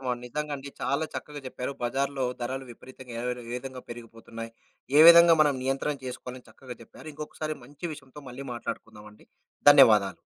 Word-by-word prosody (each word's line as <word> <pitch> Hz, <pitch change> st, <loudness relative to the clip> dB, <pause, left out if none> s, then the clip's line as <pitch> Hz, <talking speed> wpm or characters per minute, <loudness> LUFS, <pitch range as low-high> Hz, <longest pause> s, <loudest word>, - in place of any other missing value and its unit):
అవునండి. 125 Hz, -2 st, -3 dB
నిజంగా 150 Hz, +3 st, -4 dB
అండి. 140 Hz, +1 st, -9 dB
చాలా 140 Hz, +3 st, 0 dB
చక్కగా 150 Hz, -1 st, -7 dB
జెప్పారు. 125 Hz, +1 st, -5 dB
బజార్‌లో 135 Hz, +2 st, -1 dB, 0.2 s
ధరలు 130 Hz, +2 st, -4 dB
విపరీతంగా 130 Hz, 0 st, -13 dB
ఏరర్ 125 Hz, 0 st, -3 dB
ఎ -, -, -9 dB
విధంగా 130 Hz, 0 st, -7 dB
పెరిగిపోతున్నాయి, 115 Hz, -1 st, -9 dB, 0.5 s
ఏ -, -, +8 dB
విధంగా 170 Hz, 0 st, +9 dB
మనం 145 Hz, -2 st, +4 dB
నియంత్రణ 135 Hz, +3 st, -1 dB
చేసుకోవాలి 125 Hz, 0 st, -7 dB
చక్కగా 125 Hz, -3 st, -11 dB
చెప్పారు. 135 Hz, -, -15 dB
ఇంకొకసారి 155 Hz, +1 st, -5 dB
మంచి 145 Hz, +5 st, -14 dB
విషయంతో 140 Hz, 0 st, -14 dB
మళ్ళీ 135 Hz, +3 st, -8 dB
మాట్లాడుకుందాం 110 Hz, -2 st, -7 dB
అండి. -, -, -21 dB, 0.4 s
ధన్యవాదాలు. -, -, +6 dB
130 Hz, 160 wpm, -27 LUFS, 125-145 Hz, 0.5 s, విధంగా